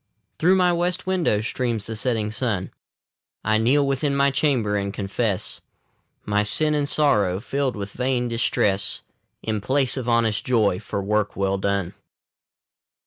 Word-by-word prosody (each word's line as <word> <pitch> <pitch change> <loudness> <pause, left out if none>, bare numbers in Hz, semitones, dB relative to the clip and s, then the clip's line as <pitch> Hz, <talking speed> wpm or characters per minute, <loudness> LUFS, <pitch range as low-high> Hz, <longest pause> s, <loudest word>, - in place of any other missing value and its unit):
Through 180 +4 +4
my 180 -2 +3
west 175 +1 -1
window 180 - +1
streams 115 -2 -2
the 110 - -5
setting 110 -1 -1
sun. 110 -5 -2 0.7
I 110 +1 +2
kneel 135 +6 +3
within 140 +1 0
my 140 0 +3
chamber, 130 -7 +1
and 100 -1 -1
confess 100 0 -2 0.6
My 105 0 +1
sin 150 +9 +2
and 145 -1 0
sorrow, 105 -12 +2
filled 135 +3 -2
with 100 -1 -6
vain 125 0 -1
distress, 105 -4 0 0.4
In 110 -2 -2
place 130 +4 +1
of 125 -2 -3
honest 115 -2 +2
joy 110 -7 +2
for 100 -1 -4
work 105 0 0
well 95 0 0
done. 100 -2 -1
115 Hz, 145 wpm, -23 LUFS, 105-140 Hz, 0.7 s, Through